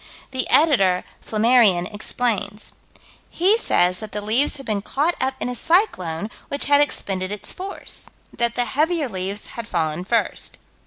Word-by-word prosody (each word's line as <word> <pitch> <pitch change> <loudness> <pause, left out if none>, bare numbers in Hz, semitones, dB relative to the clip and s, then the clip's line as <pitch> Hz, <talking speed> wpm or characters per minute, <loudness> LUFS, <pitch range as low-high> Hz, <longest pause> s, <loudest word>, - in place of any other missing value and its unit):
The 260 -1 -2
Editor 245 - +4 0.2
(Flammarion) 215 -5 +3
explains. 210 -1 -2 0.6
He 375 +5 +4
says 180 - +3
that 215 - -8
the 210 - -2
leaves 235 +8 +3
had 275 - -10
been 210 -2 -1
caught 295 - 0
up 265 0 0
in - - -2
a 250 - -3
cyclone 215 - 0 0.2
which 280 - -1
had 285 0 +5
expended 195 -9 -1
its 210 -1 -5
force; 390 +2 -6 0.3
that 235 0 +1
the 245 - +1
heavier 305 +5 0
leaves 195 -1 -4
had 235 -1 -6
fallen 160 -3 -1
first. 230 +5 -1
230 Hz, 155 wpm, -22 LUFS, 195-280 Hz, 0.6 s, had